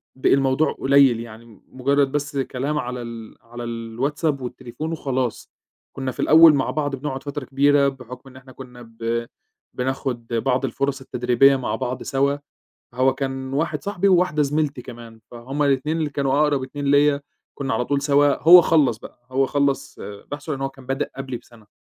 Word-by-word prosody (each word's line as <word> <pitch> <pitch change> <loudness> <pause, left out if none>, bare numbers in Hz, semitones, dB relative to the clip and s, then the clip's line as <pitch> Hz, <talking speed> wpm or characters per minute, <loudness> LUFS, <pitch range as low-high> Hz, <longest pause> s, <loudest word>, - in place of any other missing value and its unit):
بقي 130 - +2
الموضوع 135 +3 +2
قليل، 135 -3 +4
يعني 115 -2 -11
مجرد 140 +1 +1
بس 145 0 -3
كلام 135 +3 -2
على 125 -2 -4
ال 115 -2 -9
على 120 +1 -9
الWhatsApp 130 +6 -2
والتليفون 125 +4 -6
وخلاص. 130 -6 -3 0.5
كنا 135 -1 -3
في - - -16
الأول 160 0 +7
مع 135 -2 0
بعض 145 -2 -2
بنقعد 135 0 -5
فترة 145 -1 -5
كبيرة 140 +1 +3
بحكم 125 0 -8
إن 130 - -18
إحنا 130 0 -14
كنا 125 -2 -12
ب 115 0 -4 0.5
بناخد 125 -2 -3
بعض 125 +3 0
الفرص 135 +2 -2
التدريبية 125 +2 +3
مع 120 -5 -2
بعض 125 +1 -4
سوا، 140 +1 0 0.6
هو 130 +1 +2
كان 135 -1 -4
واحد 160 +4 -1
صاحبي 200 -1 0
وواحدة 180 -5 +3
زميلتي 145 -2 -1
كمان، 115 -2 -11
فهم 130 +5 -4
الاتنين 140 +3 +1
اللي 155 -3 -1
كانوا 140 0 0
أقرب 145 -3 +2
اتنين 145 +2 -6
ليّا، 145 0 +3 0.3
كنا 135 -1 -3
على 125 - 0
طول 140 +2 -1
سوا، 145 -1 +3
هو 175 +3 +10
خلّص 145 -9 +2
بقى، 120 - -14
هو 135 +1 +2
خّلص 140 -1 -1
بحثه 145 +9 -7
لأن 135 - -4
هو 135 - 0
كان 135 -1 -16
بدأ 135 +2 -2
قبلي 135 -2 -5
بسنة، 115 -3 -17
135 Hz, 175 wpm, -22 LUFS, 125-145 Hz, 0.6 s, هو